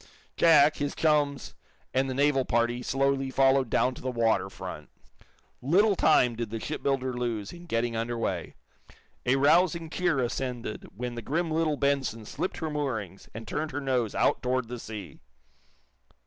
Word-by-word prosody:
Jack, 155 -2 +5
his 145 0 -2
chums 145 -3 +1 0.4
and 130 +1 +1
the 130 - -3
naval 140 -1 +3
party 120 0 0
slowly 135 +2 0
followed 135 -1 +3
down 130 - +2
to - - -11
the 130 - -2
water 115 -2 +1
front. - - -8 0.7
Little 195 - +3
time 125 -9 +4
did 115 -1 -4
the 115 +1 -4
shipbuilder 135 -1 -2
lose 115 -4 -3
in 175 0 -12
getting 115 -4 -1
under 115 +1 -2
way. 115 - -3 0.7
A 130 - +4
rousing 165 +3 +3
cheer 175 -5 +1
ascended 125 -2 -3
when 120 +2 -4
the 120 - -6
grim 160 +8 -1
little 155 -2 +1
"Benson" 135 -6 0
slipped 185 - -4
her 160 -2 -3
moorings 110 - -4
and 115 0 -7
turned 155 +1 -2
her 145 - -4
nose 125 -6 -1
out - - +2
toward 125 -2 -1
the 125 -1 -5
sea. 105 -10 -8
130 Hz, 160 wpm, -28 LUFS, 120-150 Hz, 0.7 s, Jack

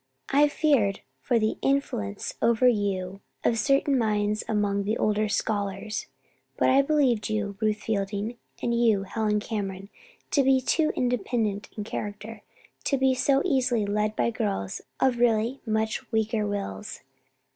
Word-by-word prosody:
"I 290 +2 +6
feared 280 -10 +2 0.2
for 230 - +1
the 215 -1 0
influence 270 - -1
over 235 +2 +4
you 195 -4 0 0.2
of 230 - +2
certain 275 +2 +2
minds 210 -1 0
among 205 -2 0
the 215 +3 -1
older 215 0 +1
scholars; 205 0 -2 0.5
but - - +3
I 270 +1 +6
believed 275 -7 +2
you, 210 -2 -2
Ruth 215 -1 0
Fielding, 210 +2 -2 0.2
and 235 - +1
you, 225 -4 +3
Helen 210 +1 0
Cameron, 200 -3 -4 0.4
to 285 - +4
be 265 0 +4
too 310 +4 +1
independent 225 -4 -1
in 210 - -2
character 210 +1 -6 0.4
to 275 - +2
be 265 0 +3
so 275 +2 +2
easily 245 -5 +1
led 210 +1 0
by 235 - +1
girls 200 - -3 0.2
of 250 -2 +2
really 235 +2 +2
much 220 +3 -1
weaker 220 -1 0
wills. 150 - -5
215 Hz, 145 wpm, -26 LUFS, 205-245 Hz, 0.5 s, I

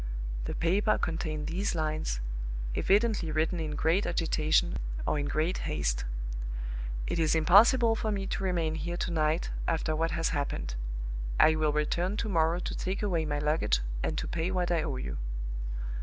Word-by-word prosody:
The - - -3
paper 195 +6 +2
contained 155 -2 -2
these 185 +3 -1
lines, 155 - -1 0.5
evidently 205 - +2
written 160 +3 +1
in 155 -2 -3
great 165 +7 +2
agitation 155 - +2 0.3
or 150 - +1
in 145 - -1
great 160 +6 0
haste: - - 0 1.0
"It - - -1
is 160 -1 +3
impossible 225 +8 +6
for 220 -1 -1
me 195 -1 -1
to 195 - -2
remain 170 -4 0
here 175 +2 -3
to 175 - -2
night, 155 0 +1 0.2
after 160 -1 0
what 165 +1 +1
has 165 0 0
happened. 140 - -2 0.7
I 160 - +7
will 155 -1 +2
return 170 +6 0
to 220 - -1
morrow 165 -2 +3
to - - -3
take 190 +3 -2
away 170 -6 +1
my 145 -1 -1
luggage, 145 - +1 0.2
and - - -1
to - - -2
pay 170 +1 -1
what 180 -2 0
I 170 -2 +2
owe - - -2
you." 65 0 -4
165 Hz, 170 wpm, -30 LUFS, 155-180 Hz, 1.0 s, I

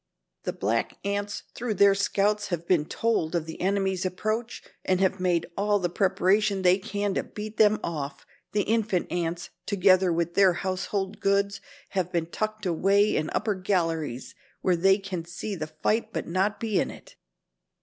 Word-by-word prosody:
The - - -1
black 110 +4 -1
ants 200 0 -2
through 230 -3 -3
their 200 +1 +6
scouts 205 +1 +1
have 170 -2 -4
been 165 -5 +3
told 180 -5 0
of 165 -2 0
the 160 - -8
enemy's 190 -1 0
approach 215 +5 -2 0.2
and 185 -1 +1
have 190 -1 +2
made 180 -2 +1
all 205 +1 +2
the 175 -3 -1
preparation 195 +1 +2
they 180 +1 +5
can 205 0 -2
to - - 0
beat 215 +1 -8
them 215 -1 +5
off. 145 -4 -4 0.3
The 205 -1 +1
infant 215 -4 0
ants, 170 -1 -2 0.2
together 185 -2 +4
with 170 0 0
their 190 -1 +5
household 190 +3 -3
goods, 200 -1 +1 0.3
have 185 -3 -1
been 170 -2 0
tucked 215 +4 -4
away 195 +4 +3
in 155 0 0
upper 215 - +1
galleries 165 - -1 0.3
where 185 - +3
they 190 +3 +4
can 195 -4 -5
see 175 +5 -5
the 155 -3 -4
fight 215 +8 -1
but - - -3
not 190 +4 0
be 220 -4 0
in - - 0
it." - - -13
190 Hz, 170 wpm, -27 LUFS, 175-205 Hz, 0.3 s, their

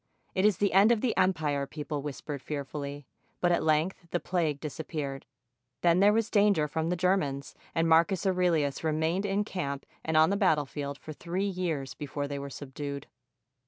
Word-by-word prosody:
"It 185 +1 +2
is 210 -4 +4
the 200 -1 +1
end 200 +4 +6
of 230 -3 +2
the 245 - +1
empire," 155 -7 +1
people 150 -1 -4
whispered 145 0 -5
fearfully; 145 0 -5 0.3
but 175 - +2
at 170 - +2
length 160 +3 +1
the 175 - 0
plague 165 -6 -1
disappeared. 150 -2 -5 0.5
Then 170 0 +4
there 200 +2 +6
was 225 0 +1
danger 200 -7 +4
from 160 +2 -2
the 180 - +1
Germans, 165 -7 0 0.2
and 165 0 +2
Marcus 170 +4 +4
Aurelius 175 -7 +1
remained 160 +5 0
in 200 +1 +1
camp 145 -9 -4 0.2
and 160 0 +1
on 160 +3 +6
the 200 - +1
battle 160 -8 +3
field 140 0 -5
for 155 - -9
three 180 +5 -2
years 170 -9 -2
before 145 0 -4
they 140 0 -4
were 140 0 -5
subdued. 140 +1 -6
160 Hz, 180 wpm, -29 LUFS, 145-185 Hz, 0.5 s, end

